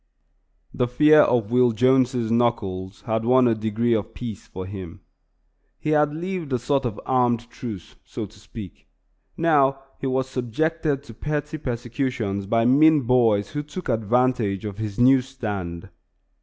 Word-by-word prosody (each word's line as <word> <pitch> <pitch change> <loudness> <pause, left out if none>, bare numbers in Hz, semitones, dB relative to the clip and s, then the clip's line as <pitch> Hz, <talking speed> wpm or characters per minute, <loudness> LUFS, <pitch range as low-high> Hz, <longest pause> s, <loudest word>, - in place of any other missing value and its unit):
The 125 - 0
fear 150 +5 +5
of 120 -6 +1
Will 125 -1 +4
Jones's 125 0 +2
knuckles 100 -6 -1
had 110 0 -2
won 125 +1 +4
a 115 - +3
degree 110 +2 0
of 110 0 -2
peace 115 -5 -7
for 95 0 -7
him. 95 -3 -8 0.8
He 155 - -2
had 150 -1 +3
lived 170 -1 -5
a 125 - +2
sort 135 +2 0
of 115 -4 -3
armed 120 -2 +1
truce, 110 -8 -8
so 110 - -6
to 100 +1 -16
speak. 105 -2 -11 0.5
Now 145 -5 +3 0.2
he 135 - -3
was 130 0 0
subjected 140 +4 -1
to 115 - -12
petty 150 +4 -4
persecutions 120 -5 -3
by 115 +2 +2
mean 150 +4 +5
boys 115 -5 +2
who 145 - -3
took 150 +2 -8
advantage 115 -3 +1
of 105 0 -6
his 105 -2 -4
new 130 +2 +5
stand. 105 -10 -6
120 Hz, 155 wpm, -23 LUFS, 110-135 Hz, 0.8 s, fear